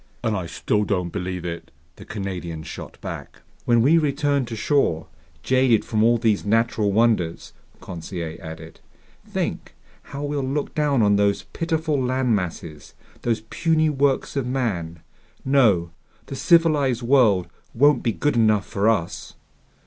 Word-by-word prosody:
"And 110 -3 0
I 90 -3 -3
still 105 +5 0
don't 90 -4 -1
believe 90 -2 -4
it!" 85 -1 -6 0.3
the - - -12
Canadian 90 -6 -5
shot - - -9
back. - - -8 0.2
"When 120 -1 +4
we 160 +6 +5
return 145 -2 0
to 115 -1 -6
shore, 105 - +1 0.4
jaded 130 -1 +3
from 110 -1 +1
all 120 +1 +4
these 110 -3 +1
natural 110 -1 +1
wonders," 105 -6 +1 0.3
Conseil 85 -1 -6
added, 80 +1 -10 0.5
"think - - -4 0.3
how 140 +1 -7
we'll 145 0 -2
look 135 +2 -2
down 145 -6 +2
on 100 -1 +4
those 100 0 +1
pitiful 160 -4 -1
land 125 -2 +1
masses, 85 -5 -6 0.3
those 115 -2 0
puny 160 -2 +2
works 140 -1 0
of 135 -3 -1
man! 90 -11 -3 0.4
No, 110 -11 +3 0.3
the 135 - -7
civilized 145 -7 +3
world 115 -8 +4 0.3
won't 145 +2 +4
be 115 - 0
good 145 +6 0
enough 110 -4 +3
for 100 +3 +1
us!" 95 -6 -2
115 Hz, 145 wpm, -23 LUFS, 95-140 Hz, 0.5 s, we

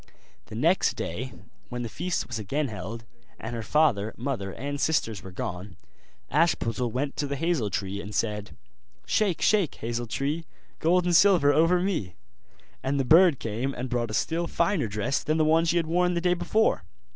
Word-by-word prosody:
The - - -9
next 165 +11 +2
day 125 +10 -4 0.4
when 120 0 -4
the - - -3
feast 175 +7 -2
was 115 -1 -5
again 140 +7 -1
held, 110 +3 -7 0.3
and 115 +2 -6
her 115 - -3
father, 110 -4 +2
mother, 115 -6 -3
and 140 +6 -5
sisters 115 -11 0
were 95 - -9
gone, 90 0 -6 0.5
Ashputtel 130 -7 +1
went 135 +4 -2
to 145 - -1
the 140 - -2
hazel 160 -7 0
tree, 100 +1 -3
and 105 +1 -8
said: 105 -2 -2 0.5
'Shake, 200 -6 +1
shake, 200 -7 +3
hazel 120 +1 -3
tree, 145 +8 -2 0.3
Gold 175 +2 +3
and 175 -1 +2
silver 170 -6 +6
over 165 +3 +4
me!' 160 - -2 0.7
And 140 +1 -1
the 135 - +1
bird 165 +1 +6
came 115 +5 -3
and 125 +1 -4
brought 120 -2 0
a 110 - -3
still 165 +8 0
finer 170 - +1
dress 105 +5 -1
than 155 +1 0
the 155 - +3
one 160 +2 +4
she 170 +1 +2
had 165 - +1
worn 180 +2 +1
the - - +1
day 180 0 +3
before. 220 +5 +1
140 Hz, 185 wpm, -27 LUFS, 110-165 Hz, 0.7 s, silver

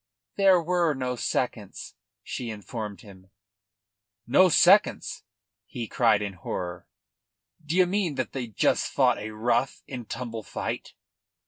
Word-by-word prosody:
"There 195 -2 +5
were 170 -2 +1
no 125 -1 -2
seconds," 115 -4 -3 0.3
she 120 -2 -5
informed 105 -2 -6
him. 95 -2 -15 1.0
"No 185 +10 +5
seconds!" 195 +5 +4 0.5
he 120 -1 -5
cried 110 -4 +3
in 100 -1 -4
horror. 90 0 -5 0.8
"D' 150 +1 -4
ye 185 0 +5
mean 180 -4 -1
they 130 -1 -3
just 110 - +1
fought - - +3
a 105 - -5
rough 115 +5 -1
and 125 -4 -7
tumble 115 -3 -5
fight?" - - -5
120 Hz, 125 wpm, -26 LUFS, 105-165 Hz, 1.0 s, There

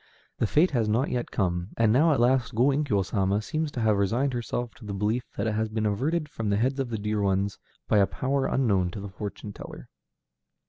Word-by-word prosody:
The 115 - +2
fate 160 - +3
has 115 -6 +1
not 120 +6 +1
yet 120 -1 -2
come, 90 -1 -1
and 115 -2 +4
now 155 +6 +5
at 140 - +2
last 125 0 +2
Go 125 +5 +4
Inkyo 135 -9 +1
Sama 100 0 +1
seems 155 +8 -2
to 120 - -3
have 110 -2 +3
resigned 120 +7 +1
herself 120 0 -3
to - - -14
the 100 -2 -5
belief 110 +5 0
that - - -1
it 110 - 0
has 110 +1 -1
been 110 0 -2
averted 150 +10 0
from 115 -7 -4
the 100 - +2
heads 130 +5 0
of 135 -3 -1
the 115 - -2
dear 105 0 -1
ones 100 0 0 0.3
by 105 - +4
a 100 - +4
power 135 +1 -1
unknown 100 -9 +2
to 95 - -7
the 100 +1 -6
fortune 105 +1 -7
teller. - - -10
110 Hz, 230 wpm, -27 LUFS, 100-130 Hz, 0.3 s, now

